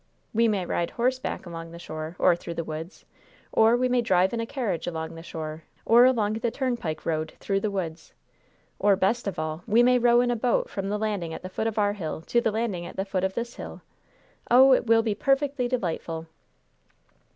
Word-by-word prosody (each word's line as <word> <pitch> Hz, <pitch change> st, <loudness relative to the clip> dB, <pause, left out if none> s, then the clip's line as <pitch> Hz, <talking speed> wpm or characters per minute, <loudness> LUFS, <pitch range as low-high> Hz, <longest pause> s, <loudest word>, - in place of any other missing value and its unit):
We 230 Hz, +1 st, +3 dB
may 200 Hz, -4 st, 0 dB
ride 170 Hz, 0 st, -1 dB
horseback 255 Hz, -1 st, -2 dB
along 165 Hz, -1 st, -7 dB
the 170 Hz, -, -10 dB
shore 155 Hz, 0 st, -6 dB
or 180 Hz, -, +4 dB
through 170 Hz, 0 st, -7 dB
the 165 Hz, -, -2 dB
woods, 160 Hz, +5 st, -7 dB, 0.5 s
or 225 Hz, +2 st, +5 dB
we 255 Hz, +1 st, +2 dB
may 250 Hz, -1 st, +2 dB
drive 190 Hz, -3 st, +2 dB
in 230 Hz, -, -1 dB
a 230 Hz, -, -2 dB
carriage 215 Hz, -, -3 dB
along 160 Hz, -2 st, -4 dB
the 165 Hz, -, -9 dB
shore 160 Hz, -1 st, -6 dB, 0.2 s
or 235 Hz, +2 st, +7 dB
along 220 Hz, -5 st, +2 dB
the 225 Hz, +2 st, -1 dB
turnpike 235 Hz, -, -3 dB
road 155 Hz, -1 st, -2 dB
through 195 Hz, -1 st, 0 dB
the 215 Hz, -, -1 dB
woods; 175 Hz, -5 st, -5 dB, 0.7 s
or, 205 Hz, -1 st, +4 dB
best 200 Hz, +5 st, 0 dB
of 195 Hz, -, -3 dB
all, 155 Hz, +1 st, -3 dB
we 230 Hz, +2 st, +5 dB
may 250 Hz, 0 st, +5 dB
row 240 Hz, 0 st, +5 dB
in 245 Hz, 0 st, +1 dB
a -, -, +1 dB
boat 235 Hz, +1 st, 0 dB
from 195 Hz, 0 st, -3 dB
the 210 Hz, -, 0 dB
landing 205 Hz, -7 st, -2 dB
at -, -, -9 dB
the 185 Hz, -, -6 dB
foot 220 Hz, +4 st, -2 dB
of 220 Hz, -, -3 dB
our 205 Hz, -1 st, +2 dB
hill 160 Hz, -6 st, -5 dB
to 235 Hz, +8 st, +1 dB
the 225 Hz, -, +1 dB
landing 210 Hz, -6 st, -2 dB
at -, -, -10 dB
the 195 Hz, -, -2 dB
foot 190 Hz, -2 st, -2 dB
of 190 Hz, 0 st, -1 dB
this 235 Hz, 0 st, -4 dB
hill. -, -, -8 dB, 0.7 s
Oh, 260 Hz, +2 st, +7 dB
it 250 Hz, -, +1 dB
will 225 Hz, 0 st, +5 dB
be 220 Hz, -2 st, 0 dB
perfectly 275 Hz, +2 st, +1 dB
delightful!" 165 Hz, -8 st, -3 dB
205 Hz, 220 wpm, -26 LUFS, 170-235 Hz, 0.7 s, or